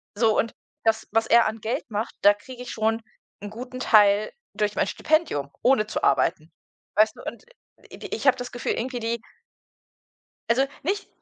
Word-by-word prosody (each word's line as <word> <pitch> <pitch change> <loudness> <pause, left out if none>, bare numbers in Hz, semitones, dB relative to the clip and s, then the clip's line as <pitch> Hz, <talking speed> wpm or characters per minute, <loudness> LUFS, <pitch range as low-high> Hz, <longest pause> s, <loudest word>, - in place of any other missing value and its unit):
So, 220 0 +3
und 230 - 0 0.3
das, 225 0 +1
was 225 +1 +2
er 235 0 +6
an 220 +1 -2
Geld 230 +3 -3
macht, 215 +2 -3
da 205 - +7
kriege 250 +4 -11
ich 245 - -7
schon 225 +1 0 0.4
'n 205 - -6
guten 250 +3 -8
Teil 210 -3 +4 0.2
durch 210 -1 -1
mein - - +1
Stipendium, 305 - 0
ohne 245 -5 +3
zu - - -4
arbeiten. 160 +3 +1 0.4
Weißt 215 +1 +4
du? - - -12
Und, - - -7
äh, - - -25
ich - - -10
ich - - -2
habe 265 - +6
das 245 - -6
Gefühl 245 - -2
irgendwie 250 +1 -3
die 230 0 -2 1.3
also, 255 +4 +4 0.2
nicht 395 +7 -2
225 Hz, 180 wpm, -25 LUFS, 210-245 Hz, 1.3 s, da